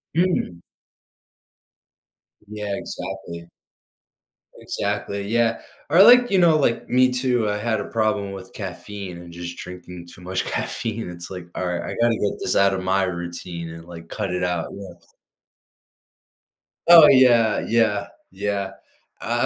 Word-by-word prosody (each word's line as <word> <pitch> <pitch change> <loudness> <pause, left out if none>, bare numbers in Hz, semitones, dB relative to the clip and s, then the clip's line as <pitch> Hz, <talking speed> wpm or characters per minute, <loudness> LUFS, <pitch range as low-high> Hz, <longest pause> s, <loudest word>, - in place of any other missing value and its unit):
Mm. 170 - 0 1.9
Yeah, 105 -1 -4
exactly. 90 -3 -7 1.1
Exactly, 100 0 -3
yeah, 115 0 +1 0.3
or, 170 +5 +6
like, 245 +2 +7
you 195 - +3
know, 165 -3 +5
like, 120 -5 0
me 130 0 +4
too, 125 -4 +1
I 105 - -1
had 110 0 -1
a - - -4
problem 110 -3 -1
with 95 -1 -10
caffeine 95 -1 -7
and 85 0 -11
just 85 0 -7
drinking 90 -1 -9
too 90 - -15
much 95 +1 -3
caffeine, 115 -4 -3
it's 85 0 -9
like, 90 -2 -7
"All 90 - -2
right, 90 -1 -2
I - - -5
gotta 120 -1 +3
get 105 - -2
this 90 - -1
out 100 0 +4
of 95 -1 -3
my 95 +1 +1
routine," 85 -1 -5
and 80 0 -10
like 85 -1 -11
cut 95 - -3
it 90 - -2
out, 90 -2 -1
yeah. 95 -3 -9 1.9
Oh, 170 -3 +10
yeah, 120 -5 +5
yeah, 110 -3 +1 0.2
yeah. 100 0 -3 0.5
I - - 0
100 Hz, 145 wpm, -22 LUFS, 90-115 Hz, 1.9 s, Oh